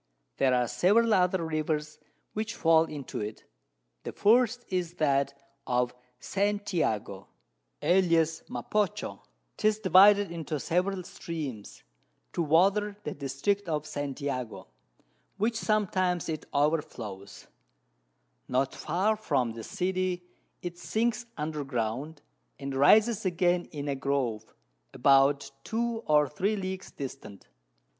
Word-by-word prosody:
There 130 -2 +3
are 125 -1 +2
several 220 - +3
other 180 -2 +2
Rivers 155 -1 -2 0.3
which 215 +1 -3
fall 165 -1 +4
into 145 -4 -6
it; 105 +1 -5 0.6
the - - -6
first 245 +2 +3
is, 180 -2 -2
that 140 -3 +1 0.3
of 125 0 +1 0.3
St. 205 +3 -1
Jago, 105 - -1 0.6
alias 165 -2 +3
Mapocho; 195 - -2 0.4
'tis 215 0 +2
divided 200 -1 +6
into 160 -3 -4
several 185 +5 0
Streams, 150 - -7 0.5
to - - -1
water 195 +6 +3
the - - -4
District 145 +8 -1
of 150 -1 -1
St. 145 -2 -4
Jago, 125 -6 -4 0.7
which 225 +3 +1
sometimes 185 -6 0
it 155 -1 -4
over 150 +2 +2
flows: 100 -7 -9 1.0
Not 130 +1 0
far 185 +7 0
from 140 - 0
the 115 0 -8
City 185 - -1 0.4
it 175 0 -6
sinks 235 +3 -1
under 150 -1 -3
Ground, 135 +4 -3 0.3
and 140 -1 -5
rises 210 - +5
again 175 -1 +1
in 145 -2 -6
a 140 - 0
Grove, 135 -6 -2 0.4
about 140 +2 +4
2 230 0 -1
or 150 -1 +4
3 195 +10 -1
Leagues 190 -1 -5
distant. 130 -8 -8
160 Hz, 120 wpm, -29 LUFS, 140-195 Hz, 1.0 s, divided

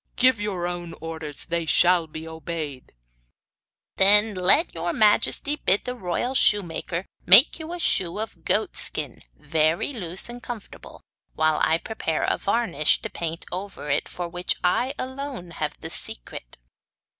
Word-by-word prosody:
Give 255 -4 +3
your 190 -4 -2
own 175 -1 -5
orders; 160 -3 -3
they 170 -1 -2
shall 175 +2 +4
be 160 +1 -8
obeyed.' 160 -4 -6 1.1
'Then 210 +2 +6
let 185 - +3
your 170 +1 -2
majesty 225 +7 +2
bid 200 -8 +1
the 250 - -3
royal 240 +3 -3
shoemaker 175 -6 +1 0.2
make 205 - +7
you 320 +1 -7
a 350 - -4
shoe 185 - 0
of 220 +1 -6
goat - - 0
skin - - -3
very 160 - 0
loose 185 -6 -3
and 240 +1 -9
comfortable, 240 -4 -10 0.3
while 155 -1 +2
I 160 - +3
prepare 165 -5 -3
a - - 0
varnish 200 -9 +1
to - - -5
paint 165 0 -4
over 185 -5 -5
it 145 - 0
of 175 -1 -5
which 175 0 -1
I 245 +10 +1
alone 260 -8 -6
have 150 -1 -3
the - - -6
secret! - - -1
180 Hz, 150 wpm, -24 LUFS, 165-220 Hz, 1.1 s, make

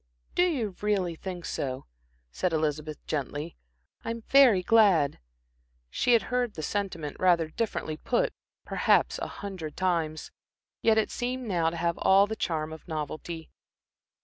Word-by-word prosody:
"Do - - +2
you 230 - -2
really 200 -4 +1
think 175 +1 -7
so?" 130 -1 -3 0.5
said 180 - -1
Elizabeth, 155 -1 -1
gently. 150 +2 -3 0.5
"I'm 230 0 -4
very 250 -10 +6
glad." 185 -10 +4 0.7
She 245 - +2
had 230 - +5
heard 245 -3 0
the 155 - -5
sentiment, 170 -6 -3
rather 170 -3 +3
differently 160 -5 -3
put, 240 +8 0 0.3
perhaps - - +2
a - - -3
hundred 185 -7 -7
times. 165 -4 -1 0.5
Yet 220 -1 +4
it 220 - +1
seemed 250 0 -3
now 170 -5 +2
to 170 - -6
have 170 0 -1
all 195 +1 +6
the 220 +2 -4
charm 160 -6 -2
of 160 - -12
novelty. 160 +1 -5
175 Hz, 145 wpm, -28 LUFS, 155-215 Hz, 0.7 s, very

